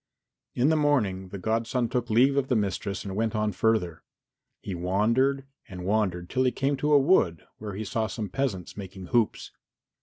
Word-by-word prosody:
In 125 +4 +3
the 160 - +3
morning 110 -12 +1
the 100 - -6
godson 115 +4 0
took 120 0 -2
leave 125 +5 +4
of 140 -1 +1
the 125 - +1
mistress 100 -2 -2
and 95 -1 -5
went 110 +1 -1
on 105 0 0
further. 95 -4 0 0.6
He 100 - -4
wandered 115 +10 +1 0.2
and 90 -2 -7
wandered 95 -4 0
till 130 +7 0
he 125 - +3
came 140 +2 0
to 150 +2 +1
a 145 - +8
wood 135 - +2
where 105 -2 -6
he 110 +2 -4
saw 110 +2 -1
some 105 0 -4
peasants 100 -6 -3
making 95 -2 -8
hoops. 115 -3 +1
110 Hz, 185 wpm, -27 LUFS, 95-130 Hz, 0.6 s, a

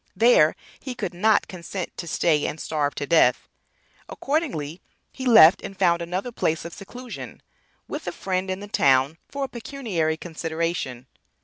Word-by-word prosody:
There 195 -7 +5 0.2
he 260 -3 -6
could 195 -7 -4
not 210 +4 +3
consent 180 0 -6
to 170 - -6
stay 155 -3 +1
and 155 - -5
starve 150 -2 -1
to 145 - -3
death. 165 +2 +3 0.6
Accordingly 205 - -2 0.3
he 260 - -5
left 210 -6 +8
and 195 - -8
found 170 -2 +3
another 180 +7 -3
place 160 -8 -1
of 170 - -7
seclusion 245 +5 -9 0.5
with - - -6
a - - -1
friend 190 0 -2
in 185 +1 -3
the 205 - -7
town 140 -2 +3
for 280 0 -4
a - - -1
pecuniary 220 - -2
consideration. 160 -6 -3
175 Hz, 155 wpm, -24 LUFS, 160-220 Hz, 0.6 s, left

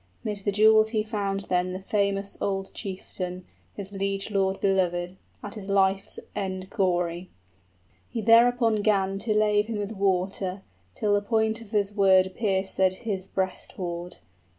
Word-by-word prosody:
'Mid 210 -1 -2
the 205 +1 -1
jewels 215 +1 +5
he 215 -2 0
found 200 -3 -2
then 180 -1 -1
the 185 - -4
famous 200 0 -1
old 195 -1 -2
chieftain, 185 -2 -5 0.3
His 200 -1 -7
liegelord 195 0 -1
belovèd, 180 -2 0 0.3
at 205 - -6
his 205 -3 -8
life's 195 0 +1 0.2
end 190 -1 -4
gory: 180 -2 0 0.8
He 235 - -4
thereupon 230 -1 +5
'gan 195 -2 +1
to 215 +1 0
lave 210 0 +3
him 225 -2 -3
with 205 0 -3
water, 190 -1 -1 0.3
Till 205 -1 +1
the 205 - +3
point 220 +1 0
of 225 - -12
his 205 -2 0
word 190 -2 +4
piercèd 190 -3 +1
his 195 -4 -3
breast 190 -1 -3
hoard. 175 -1 -5
195 Hz, 150 wpm, -26 LUFS, 190-210 Hz, 0.8 s, jewels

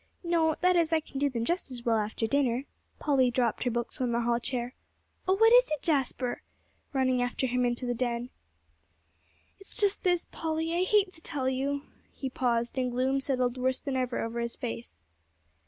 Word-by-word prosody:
"No 330 -2 +2
that 365 +1 +4
is, 335 -2 +3
I 325 - +4
can 275 -3 -7
do 285 0 +2
them 230 -3 -2
just 345 0 -1
as 245 -2 -7
well 225 -2 +3
after 215 +2 -2
dinner." 255 0 +1 0.3
Polly 270 -4 +3
dropped 240 -1 0
her - - +3
books 240 +2 -3
on 250 -2 +1
the 235 0 +1
hall 235 0 +1
chair. 245 0 -2 0.5
"Oh, 375 - +4
what 450 +3 +6
is - - +7
it, 305 -2 -2
Jasper?" 270 -5 0 0.5
running 260 -2 +2
after 245 +2 -1
him 250 0 +1
into 240 +1 -1
the 245 - 0
den. 240 0 -2 1.3
"It's 390 - -10
just 405 -1 +2
this, 355 -2 +1
Polly, 320 0 -2
I 355 +2 +2
hate 405 -1 +3
to 320 - -10
tell 270 -5 -1
you 275 +2 -1 0.2
" - - -35
He 265 -2 -3
paused, 240 0 0
and 250 -1 +1
gloom 260 +2 +1
settled 255 -2 0
worse 260 +1 +1
than 275 -2 -3
ever 255 -1 -1
over 230 +1 -3
his 235 0 -2
face. 230 - -6
260 Hz, 200 wpm, -29 LUFS, 240-315 Hz, 1.3 s, is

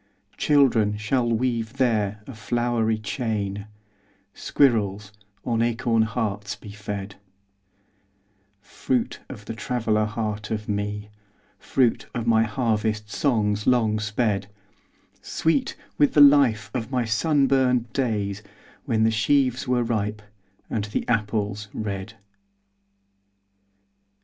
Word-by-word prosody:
Children 120 -8 +3
shall 120 +3 0
weave 115 -1 -1
there 110 -6 0
a 135 - -9
flowery 115 0 0
chain, 105 -2 -3 0.7
Squirrels 105 -6 +1 0.3
on 115 -2 0
acorn 115 -1 +1
hearts 105 -2 -2
be 105 - -11
fed:— 100 -1 -6 1.4
Fruit 125 +2 -2
of 105 -5 -9
the 115 - -5
traveller 110 -2 0
heart 105 -1 -3
of 105 -1 -3
me, 105 0 -3 0.5
Fruit 125 -4 +1
of 120 -2 -2
my 115 -1 +4
harvest 110 -2 -1
songs 105 -4 0
long 115 -4 +3
sped: 105 -2 -1 0.7
Sweet 160 -4 0 0.2
with 145 - +4
the - - +6
life 140 -6 +6
of 120 -2 -3
my 125 -3 0
sunburned 130 0 +2
days 105 -6 -1 0.4
When 115 -5 +1
the 110 - +4
sheaves 130 +3 +1
were 125 -1 +2
ripe, 110 -2 -2 0.4
and 105 -3 -2
the 105 - -3
apples 105 -2 -1
red. 105 0 -4
110 Hz, 110 wpm, -24 LUFS, 105-125 Hz, 1.4 s, the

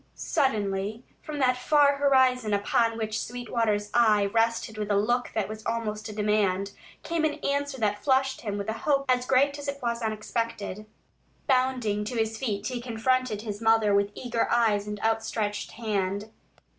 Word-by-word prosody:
Suddenly, 210 -3 -1 0.2
from 305 -1 -6
that 255 -2 +3
far 285 +2 +4
horizon 260 -6 +3
upon 225 +3 +1
which 220 0 -2
Sweetwater's 230 -4 -2
eye 215 -4 +4
rested 225 +1 0
with 210 -1 -3
a 205 - +2
look 240 +4 +1
that 210 -3 0
was 215 +1 -8
almost 220 -2 -3
a - - -5
demand, 205 -2 0 0.3
came 335 -1 -1
an 305 -1 +1
answer 280 0 -1
that 205 -2 0
flushed 265 0 +2
him 205 -3 -3
with 200 - -4
a 220 - -1
hope 275 -2 +1
as 250 -1 +1
great 280 +2 +3
as 285 - -7
it 280 0 -3
was 235 -2 -2
unexpected. 215 -1 -3 0.6
Bounding 255 -6 +1
to 235 +3 -4
his 225 0 0
feet, 215 -4 -3
he 245 0 -3
confronted 240 -2 0
his 210 -1 -5
mother 225 -2 +4
with 200 0 +3
eager 240 -2 -1
eyes 215 -4 +2
and 210 0 -5
outstretched 220 -2 -1
hand. 205 -2 -2
225 Hz, 170 wpm, -27 LUFS, 210-255 Hz, 0.6 s, far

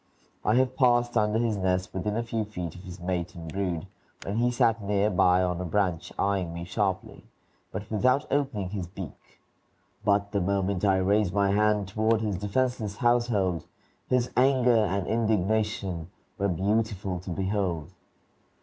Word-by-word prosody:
I 105 - +3
have 130 0 +2
passed 120 -2 +3
under 105 -1 +2
his 115 -2 +1
nest 95 -1 0
within 105 +3 -2
a 115 - 0
few 115 -1 -2
feet 90 -6 -5
of 90 - -11
his 90 -1 -9
mate 90 -1 -3
and 80 -2 -8
brood, 90 -5 -2 0.4
when 100 +2 -2
he 120 +1 +3
sat 115 -2 +2
near 100 +1 +1
by 90 0 +4
on 90 -1 -1
a - - -1
branch 90 -2 -1
eying 95 -4 0
me 85 - -5
sharply, 95 +1 -2 0.5
but 100 +2 -5
without 125 +6 +2
opening 115 -10 -1
his 95 -4 -4
beak; 90 -2 -10 0.6
but 100 0 +2
the 100 -2 0
moment 100 0 0
I 95 -2 +4
raised 100 0 +2
my 100 -1 +3
hand 105 -1 +2
toward 110 +2 +1
his 105 -4 -1
defenseless 105 +1 -1
household 120 -8 +1 0.4
his 125 -1 +1
anger 130 -1 +4
and 95 -1 -1
indignation 105 -5 0 0.3
were 100 0 +1
beautiful 100 0 0
to 90 - -9
behold. 95 -3 -1
100 Hz, 160 wpm, -27 LUFS, 90-110 Hz, 0.6 s, by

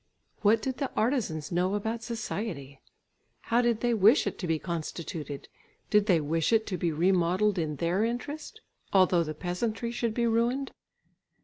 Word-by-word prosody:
What 220 +1 +4
did 260 -1 -2
the 275 - -1
artisans 215 - 0
know 180 +3 +1
about 220 +3 -2
society? 205 - -5 0.6
How 235 +2 +2
did 235 -2 +1
they 240 -1 +2
wish 220 +5 +5
it - - -3
to 180 - -3
be 165 -1 +1
constituted? 160 -3 -5 0.4
Did 210 -1 +4
they 180 -5 +4
wish 160 +4 0
it 220 -1 +3
to - - 0
be 170 0 +1
remodelled 180 +4 +2
in 155 -2 -2
their 170 +7 0
interest, 290 - -4 0.3
although 185 -3 +4
the 155 -1 -5
peasantry 215 +8 -2
should 235 -2 -2
be 235 - +1
ruined? 235 +4 +1
205 Hz, 165 wpm, -28 LUFS, 170-235 Hz, 0.6 s, wish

